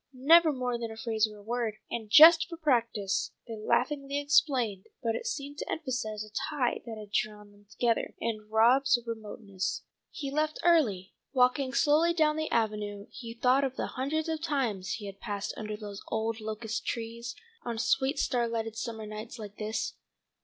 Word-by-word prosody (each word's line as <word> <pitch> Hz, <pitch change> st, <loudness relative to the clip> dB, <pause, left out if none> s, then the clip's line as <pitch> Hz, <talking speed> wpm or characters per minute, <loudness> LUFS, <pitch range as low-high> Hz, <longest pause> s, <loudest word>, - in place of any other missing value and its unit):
Never 315 Hz, +5 st, +6 dB
more 250 Hz, -3 st, -2 dB
than 230 Hz, -1 st, -3 dB
a 220 Hz, -, -9 dB
phrase 225 Hz, -1 st, +1 dB
or 210 Hz, -1 st, -12 dB
a 205 Hz, -, -14 dB
word, 230 Hz, -1 st, -2 dB, 0.2 s
and 225 Hz, -3 st, -4 dB
"just 325 Hz, +8 st, +9 dB
for 335 Hz, -, -7 dB
practice," 235 Hz, -, 0 dB
they 225 Hz, -, -5 dB
laughingly 275 Hz, +6 st, 0 dB
explained, 260 Hz, -9 st, +2 dB, 0.2 s
but 230 Hz, -1 st, +1 dB
it 465 Hz, -, -4 dB
seemed 290 Hz, -9 st, -4 dB
to -, -, -4 dB
emphasize 250 Hz, -8 st, -3 dB
a 215 Hz, -1 st, -14 dB, 0.2 s
tie 275 Hz, -6 st, 0 dB
that 225 Hz, -1 st, -6 dB
had 210 Hz, -1 st, -10 dB
drawn 210 Hz, -1 st, -2 dB
them 205 Hz, 0 st, -22 dB
together, 230 Hz, +1 st, 0 dB
and 215 Hz, -2 st, -3 dB
Rob's 245 Hz, +4 st, +5 dB
remoteness. 210 Hz, -4 st, -4 dB, 0.3 s
He 280 Hz, -3 st, -5 dB
left 310 Hz, +2 st, 0 dB
early. 230 Hz, -, +3 dB, 0.2 s
Walking 255 Hz, +1 st, +3 dB
slowly 310 Hz, +5 st, +3 dB
down 305 Hz, -2 st, +3 dB
the 315 Hz, 0 st, -2 dB
avenue 210 Hz, -2 st, -1 dB
he 230 Hz, -2 st, -8 dB
thought 255 Hz, +3 st, +3 dB
of 265 Hz, -1 st, -1 dB
the -, -, -2 dB
hundreds 305 Hz, +5 st, -1 dB
of 320 Hz, -1 st, -2 dB
times 230 Hz, -, -1 dB
he 215 Hz, -2 st, -5 dB
had 195 Hz, 0 st, -8 dB
passed 200 Hz, 0 st, -4 dB
under 215 Hz, -1 st, -5 dB
those 205 Hz, -2 st, -8 dB
old 225 Hz, 0 st, -1 dB
locust 220 Hz, +1 st, -4 dB
trees 235 Hz, +1 st, -4 dB, 0.3 s
on 235 Hz, -1 st, -3 dB
sweet 265 Hz, +5 st, +1 dB
starlighted 230 Hz, -3 st, -1 dB
summer 225 Hz, -1 st, -5 dB
nights 215 Hz, +3 st, -7 dB
like 210 Hz, -2 st, -9 dB
this. 215 Hz, +1 st, -2 dB
230 Hz, 175 wpm, -29 LUFS, 215-275 Hz, 0.3 s, just